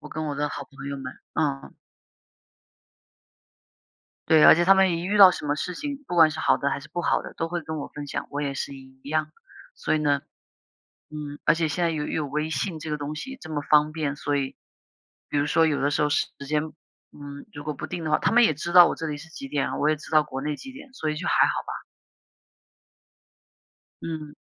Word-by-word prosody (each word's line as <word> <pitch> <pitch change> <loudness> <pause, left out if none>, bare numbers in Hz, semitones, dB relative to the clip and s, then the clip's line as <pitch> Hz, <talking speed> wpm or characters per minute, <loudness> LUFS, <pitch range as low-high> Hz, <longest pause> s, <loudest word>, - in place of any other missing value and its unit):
我 150 - -10
跟 155 +1 -4
我 145 - -3
的 150 +1 -1
好 140 -1 -6
朋 140 +1 -10
友 140 - -4
们， 130 -1 -6 0.2
嗯。 145 -3 -2 2.5
对， 160 -1 +6
而 - - +10
且 170 - +2
他 195 +3 +6
们 190 -2 +4
一 170 - -5
遇 210 +2 0
到 195 -2 +10
什 150 - -5
么 145 - +1
事 180 +3 -3
情， 285 - -5
不 180 - -4
管 165 -2 +7
是 155 - -7
好 - - +3
的 140 - 0
还 140 - -2
是 150 - -14
不 175 - -2
好 - - +1
的， - - -9
都 165 - -3
会 175 0 -3
跟 160 -1 -5
我 - - -5
分 145 -1 -8
享， - - -4
我 145 +1 -3
也 140 -1 -1
是 135 0 -4
一 130 0 -16
样。 155 0 -1 0.4
所 - - -1
以 - - +2
呢， 145 -2 +1 0.9
嗯， 150 -1 -6
而 150 - +6
且 165 -1 0
现 155 +4 -1
在 170 - +2
又 150 -2 -3
有 155 - -2
微 150 +3 -2
信 160 +3 -2
这 155 - -6
个 150 - -1
东 145 +1 -5
西 265 - -7
这 160 - -9
么 145 -1 -2
方 150 +1 +3
便， 150 -3 -2
所 145 0 -2
以， 135 -1 -2 0.7
比 145 - -1
如 145 - +2
说 160 +2 +3
有 150 -2 0
的 145 +1 +1
时 - - 0
候 150 - +2
时 145 - +2 0.2
间， 150 0 +1 0.5
嗯， 140 -1 -10
如 145 - -8
果 150 -1 -4
不 - - -5
定 175 -2 -5
的 155 - -2
话 150 - +4
他 - - +1
们 240 +2 +6
也 155 -10 +3
知 175 +3 -5
道 175 -1 +10
我 - - -2
这 165 - -5
里 150 - -3
是 155 +3 -11
几 140 -3 -8
点 140 0 -1
啊， - - -4
我 150 - +2
也 - - +2
知 150 - -12
道 155 -1 +4
国 135 -2 -6
内 150 0 -2
几 265 - -10
点， 275 0 -13
所 155 -10 -2
以 - - -4
就 - - -4
还 - - +5
好 - - 0
吧。 - - -6 2.2
嗯。 155 -2 -5
150 Hz, 260 characters per minute, -25 LUFS, 145-165 Hz, 2.5 s, 而